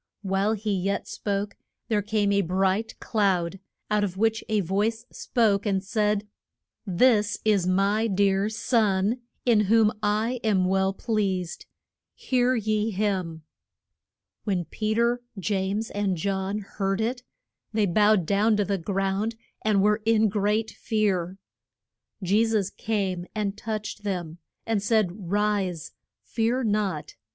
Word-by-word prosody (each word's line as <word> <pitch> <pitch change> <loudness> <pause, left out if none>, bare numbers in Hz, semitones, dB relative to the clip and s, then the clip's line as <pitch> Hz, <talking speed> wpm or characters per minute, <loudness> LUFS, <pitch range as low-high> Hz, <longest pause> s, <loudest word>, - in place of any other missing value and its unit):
While 195 +2 +1
he 215 -1 -2
yet 195 +1 -1
spoke 200 0 -3 0.3
there 215 -2 +1
came 205 0 0
a 200 0 +3
bright 190 +4 0
cloud, 195 -4 0 0.3
out 210 -1 +2
of 190 -2 -3
which 225 +1 +1
a 215 -1 +2
voice 210 +6 -1
spoke 210 -3 +1
and 195 -2 0
said, 210 0 0 0.6
This 210 +2 +3
is 200 -4 +3
my 200 +4 +2
dear 200 0 +2
Son, 220 -1 +1 0.3
in 235 -4 +4
whom 220 +1 +4
I 215 +4 0
am 200 -4 +2
well 190 +1 +2
pleased. 195 -4 -2 0.5
Hear 255 0 +1
ye 215 -1 0
him. 185 -6 -2 1.0
When 185 -5 -1
Pe 215 +6 -2
ter, 235 +1 +2 0.2
James, 200 +3 -1
and 200 -3 -1
John 195 +3 -1
heard 195 -1 -2
it, 240 +3 -1 0.5
they 215 -1 +2
bowed 205 0 +3
down 210 +4 +2
to 205 - +1
the 195 0 -1
ground, 195 +4 -1 0.3
and 205 -3 +2
were 210 +1 +3
in 220 -1 +3
great 210 +2 0
fear. 195 -5 -1 0.9
Je 200 +5 +3
sus 215 -4 0
came 190 -5 -2
and 205 -2 -1
touched 215 -1 -5
them, 175 -5 -4 0.3
and 225 -3 0
said, 200 -4 0
Rise. 200 -5 0 0.3
Fear 235 +3 0
not. 205 -8 -1
205 Hz, 135 wpm, -26 LUFS, 195-220 Hz, 1.0 s, in